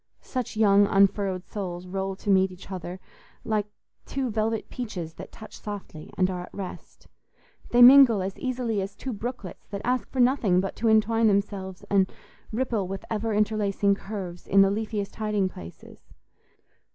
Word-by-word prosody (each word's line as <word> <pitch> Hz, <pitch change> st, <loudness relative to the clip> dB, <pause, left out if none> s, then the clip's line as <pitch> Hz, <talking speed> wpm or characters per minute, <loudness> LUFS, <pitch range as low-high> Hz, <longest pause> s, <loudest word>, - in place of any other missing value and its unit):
Such 250 Hz, -4 st, -4 dB
young 205 Hz, -2 st, +5 dB
unfurrowed 195 Hz, -2 st, +2 dB
souls 180 Hz, -3 st, -5 dB
roll 190 Hz, +1 st, -3 dB
to 200 Hz, +1 st, -2 dB
meet 190 Hz, 0 st, +4 dB
each 185 Hz, +2 st, -12 dB
other 180 Hz, 0 st, -6 dB, 0.4 s
like 210 Hz, -2 st, -1 dB, 0.4 s
two 265 Hz, -3 st, -2 dB
velvet 220 Hz, 0 st, -1 dB
peaches 180 Hz, -10 st, -6 dB
that -, -, -10 dB
touch 220 Hz, -, -12 dB
softly 200 Hz, -7 st, -8 dB
and 185 Hz, -, +3 dB
are 180 Hz, -1 st, -4 dB
at 180 Hz, -, -11 dB
rest; 195 Hz, -2 st, -9 dB, 0.6 s
they 245 Hz, 0 st, +6 dB
mingle 245 Hz, -6 st, +8 dB
as 190 Hz, 0 st, -4 dB
easily 245 Hz, -5 st, -1 dB
as 195 Hz, +1 st, -5 dB
two 260 Hz, +2 st, -5 dB
brooklets 225 Hz, -3 st, -7 dB
that 200 Hz, -1 st, -6 dB
ask 250 Hz, -3 st, 0 dB
for 260 Hz, -, -5 dB
nothing 245 Hz, -8 st, +3 dB
but 195 Hz, +1 st, -2 dB
to 230 Hz, -, 0 dB
entwine 220 Hz, +1 st, +4 dB
themselves 195 Hz, -2 st, -1 dB
and 195 Hz, -2 st, +2 dB, 0.4 s
ripple 225 Hz, -4 st, -1 dB
with 195 Hz, +1 st, -6 dB
ever 220 Hz, +1 st, -1 dB
interlacing 205 Hz, -1 st, +2 dB
curves 195 Hz, -3 st, -6 dB
in 195 Hz, 0 st, +6 dB
the 195 Hz, -, +2 dB
leafiest 210 Hz, -1 st, -3 dB
hiding 210 Hz, -3 st, 0 dB
places. 85 Hz, -, -12 dB
200 Hz, 165 wpm, -26 LUFS, 190-225 Hz, 0.6 s, mingle